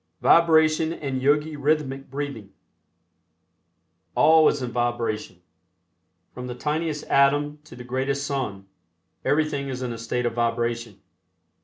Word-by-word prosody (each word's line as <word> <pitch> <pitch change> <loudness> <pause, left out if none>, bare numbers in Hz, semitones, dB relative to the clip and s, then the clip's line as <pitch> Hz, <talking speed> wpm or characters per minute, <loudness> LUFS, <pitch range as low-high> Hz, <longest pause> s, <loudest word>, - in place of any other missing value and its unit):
VIBRATION 160 -1 +4
AND 135 -5 -4
YOGI 150 +3 +2
RHYTHMIC 140 -2 -1
BREATHING 135 -7 -5 1.7
All 160 0 +6
is 140 - +1
in 125 - -4
vibration. 120 -6 -2 0.9
From 125 0 -7
the 125 - -5
tiniest 150 +3 -2
atom 145 +2 +2
to - - -13
the 125 - -9
greatest 135 +3 -2
sun, 125 -9 -3 0.6
everything 145 -2 0
is 130 -1 -4
in 120 -2 -3
a 115 - -8
state 120 +2 -2
of 120 - 0
vibration. 115 -2 -2
135 Hz, 125 wpm, -24 LUFS, 120-150 Hz, 1.7 s, All